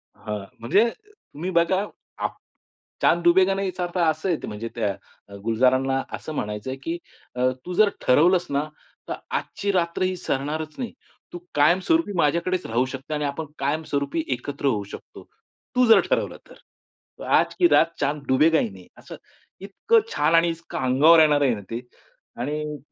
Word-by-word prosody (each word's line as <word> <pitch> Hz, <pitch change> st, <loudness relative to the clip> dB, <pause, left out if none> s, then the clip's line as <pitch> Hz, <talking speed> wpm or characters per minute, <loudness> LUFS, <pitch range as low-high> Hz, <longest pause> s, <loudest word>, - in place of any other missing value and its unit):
हां, 105 Hz, -2 st, -6 dB
म्हणजे 200 Hz, -, +3 dB, 0.2 s
तुम्ही 185 Hz, -, -8 dB
बघा 185 Hz, +3 st, +2 dB, 0.4 s
आ -, -, +3 dB, 0.7 s
चांद 170 Hz, 0 st, +3 dB
डुबेगा 185 Hz, +3 st, +5 dB
नाही 195 Hz, 0 st, -1 dB
याचा 180 Hz, 0 st, -3 dB
अर्थ 175 Hz, +1 st, -4 dB
असं 160 Hz, +2 st, +1 dB
आहे 170 Hz, -, -2 dB
म्हणजे 105 Hz, +2 st, -5 dB
त्या, 110 Hz, -4 st, 0 dB, 0.4 s
अ, 100 Hz, -, -10 dB
गुलजारांना 130 Hz, +4 st, +2 dB
असं 155 Hz, -, -8 dB
म्हणायचंय 105 Hz, +4 st, -4 dB
की 165 Hz, +1 st, -3 dB, 0.4 s
अ, 125 Hz, +1 st, +2 dB, 0.2 s
तू 180 Hz, -, -5 dB
जर 210 Hz, +3 st, +5 dB
ठरवलंस 175 Hz, +7 st, +4 dB
ना, 140 Hz, +1 st, +1 dB, 0.5 s
तर -, -, -1 dB, 0.2 s
आजची 200 Hz, -, -3 dB
रात्र 170 Hz, -1 st, 0 dB
ही 185 Hz, 0 st, 0 dB
सरणारच 155 Hz, +2 st, -3 dB
नाही. 245 Hz, -3 st, -5 dB, 0.4 s
तू 175 Hz, -, -6 dB, 0.2 s
कायमस्वरूपी 190 Hz, -, +3 dB
माझ्याकडेच 170 Hz, +3 st, +1 dB
राहू 120 Hz, +3 st, +1 dB
शकते 135 Hz, +3 st, -7 dB
आणि 150 Hz, -1 st, -1 dB
आपण 145 Hz, +3 st, -3 dB
कायमस्वरूपी 145 Hz, +1 st, -1 dB
एकत्र 140 Hz, +4 st, -7 dB
होऊ 105 Hz, -6 st, +1 dB
शकतो. -, -, -11 dB, 0.5 s
तू 250 Hz, 0 st, +5 dB
जर 225 Hz, -, +8 dB
ठरवलं -, -, 0 dB
तर. -, -, -14 dB, 0.7 s
आज -, -, +2 dB
की 350 Hz, -, +6 dB
रात -, -, +6 dB
चांद 145 Hz, +1 st, -1 dB
डुबेगा 155 Hz, +5 st, +4 dB
ही -, -, -1 dB
नाही 95 Hz, -2 st, -14 dB
असं -, -, -11 dB, 0.5 s
इतकं 325 Hz, -, +2 dB
छान 165 Hz, -, +2 dB
आणि 170 Hz, +1 st, +4 dB
इतकं 165 Hz, 0 st, -6 dB
अंगावर 140 Hz, +6 st, +5 dB
येणार 150 Hz, -2 st, +5 dB
आहे 135 Hz, -4 st, +3 dB
ना 105 Hz, -, -8 dB
ते 115 Hz, -, -2 dB, 0.6 s
आणि 150 Hz, +3 st, -3 dB
155 Hz, 165 wpm, -24 LUFS, 130-180 Hz, 0.7 s, जर